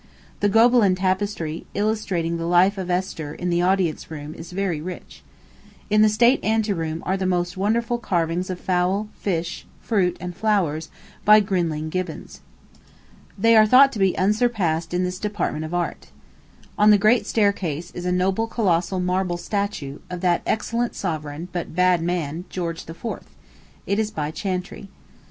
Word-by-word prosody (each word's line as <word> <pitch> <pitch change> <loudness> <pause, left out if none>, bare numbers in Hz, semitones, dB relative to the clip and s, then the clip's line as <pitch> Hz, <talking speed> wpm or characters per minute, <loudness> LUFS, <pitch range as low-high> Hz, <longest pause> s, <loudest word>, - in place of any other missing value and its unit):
The 205 - +2
Gobelin 225 -2 +5
tapestry, 185 -3 -2
illustrating 195 -6 -1
the 165 0 -3
life 185 +3 +4
of 185 -1 -4
Esther, 175 -5 -2
in 180 0 -3
the 170 0 +2
Audience 180 -4 0
Room, 150 -1 -7
is 170 +1 -10
very 180 -4 -2
rich. 180 +2 -8 0.7
In 210 0 +5
the 215 - +6
State 235 +5 +3
Ante 220 -1 +1
Room 160 -2 -4
are 190 - +1
the 190 -1 -1
most 175 -1 0
wonderful 230 +5 0
carvings 175 -3 -1
of 180 -1 -4
fowl, 185 +3 0
fish, 175 -3 -3
fruit, 180 -5 0
and 180 -1 -6
flowers, 175 -7 0 0.3
by 210 +1 +7
Grinling 170 -6 -1
Gibbons. 185 -2 -5 1.0
They 230 +3 +4
are 215 -1 +7
thought 270 +4 +7
to 220 - -6
be 190 -2 +2
unsurpassed 190 -5 +1
in 180 +1 0
this 180 0 -3
department 195 -7 -2
of 155 - -7
art. 175 -1 -3 0.7
On 210 +1 +6
the 210 - +7
Great 215 +1 +3
Staircase 185 -6 0
is 175 - -7
a - - +1
noble 190 +5 +1
colossal 185 -5 0
marble 180 -1 0
statue, 185 -8 -3
of 180 -1 -5
that 175 -2 +2
excellent 235 +2 -1
sovereign, 155 -2 -4
but 175 -2 -5
bad 180 -1 +3
man, 170 -1 -2
George 165 -3 -5
IV. 165 +7 -10 0.8
It 200 +2 0
is 215 -1 0
by 155 -7 -3
Chantrey. 185 +2 -4
185 Hz, 160 wpm, -23 LUFS, 170-205 Hz, 1.0 s, by